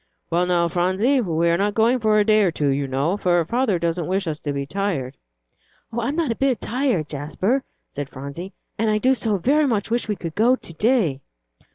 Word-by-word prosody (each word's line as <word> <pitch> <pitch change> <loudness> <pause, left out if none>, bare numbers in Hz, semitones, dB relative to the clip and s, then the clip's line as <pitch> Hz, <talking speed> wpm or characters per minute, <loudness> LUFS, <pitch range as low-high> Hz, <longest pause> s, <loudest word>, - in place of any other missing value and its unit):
"Well, 175 +2 +2
now, 175 -1 +2
Phronsie, 190 - +1
we 170 -5 0
are 170 +1 +2
not 205 +1 0
going 235 +3 +3
for 215 -1 +3
a 210 - +3
day 215 0 +4
or 195 - +3
two, 150 -3 -1
you 140 0 0
know, 140 +9 0
for 175 -4 +2
father 235 0 +1
doesn't 170 0 -1
wish 190 +1 0
us 155 -2 -3
to 145 - -3
be 140 -1 -3
tired." 160 -7 -2 0.8
"I'm 235 +5 -1
not 320 -7 0
a - - -1
bit 265 -4 +1
tired, 245 - -1
Jasper," 170 - -1 0.3
said 145 -1 -5
Phronsie, 140 +8 -8 0.3
"and 220 0 +2
I 215 - +2
do 255 +5 +3
so 220 -4 0
very 285 - +2
much 225 -3 -1
wish 235 0 0
we 210 - 0
could 165 -4 -6
go 235 +7 +4
to 170 - -9
day." 195 - +1
195 Hz, 215 wpm, -22 LUFS, 165-230 Hz, 0.8 s, day